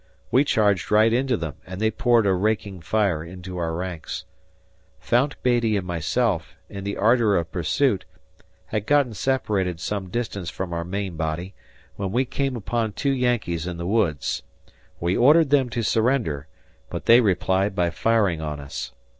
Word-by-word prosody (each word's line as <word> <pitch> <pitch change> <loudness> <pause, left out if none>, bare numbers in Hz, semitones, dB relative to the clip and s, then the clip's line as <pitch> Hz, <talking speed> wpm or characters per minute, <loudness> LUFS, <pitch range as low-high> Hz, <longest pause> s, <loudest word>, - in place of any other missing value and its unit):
We 130 - +5
charged 105 - +2
right 110 +2 +4
into 125 0 +1
them 80 -7 -5
and 90 +1 -8
they 110 +1 +2
poured 115 0 +3
a 95 - +3
raking 100 -1 -1
fire 95 -4 0
into 90 +1 -8
our 80 -1 -2
ranks. 90 -2 -5 0.7
Fount 130 +4 +1
Beattie 120 -4 +2
and 95 - -3
myself, 90 +2 -1
in 100 0 -7
the 100 - -3
ardor 110 -1 +4
of 85 -1 -2
pursuit, 100 - +1 0.6
had 105 -1 -3
gotten 145 -5 +3
separated 100 -7 -1
some 95 +1 -3
distance 100 -5 -3
from 90 -2 -5
our 85 0 -2
main 95 -1 -4
body, 80 +4 -3 0.4
when 95 -2 -3
we 125 +5 +1
came 135 +1 -2
upon 115 -1 -2
two 140 +8 0
Yankees 120 -10 0
in 85 -1 -4
the 85 - -5
woods. 95 -8 0 0.6
We 85 +2 0
ordered 150 +4 +5
them 135 -3 +4
to 115 0 -2
surrender, 110 - +1 0.4
but - - -5
they 115 +2 +7
replied 95 -1 +1
by 85 -2 +1
firing 100 -6 +1
on 75 -2 -4
us. 70 -1 -6
100 Hz, 165 wpm, -24 LUFS, 90-120 Hz, 0.7 s, they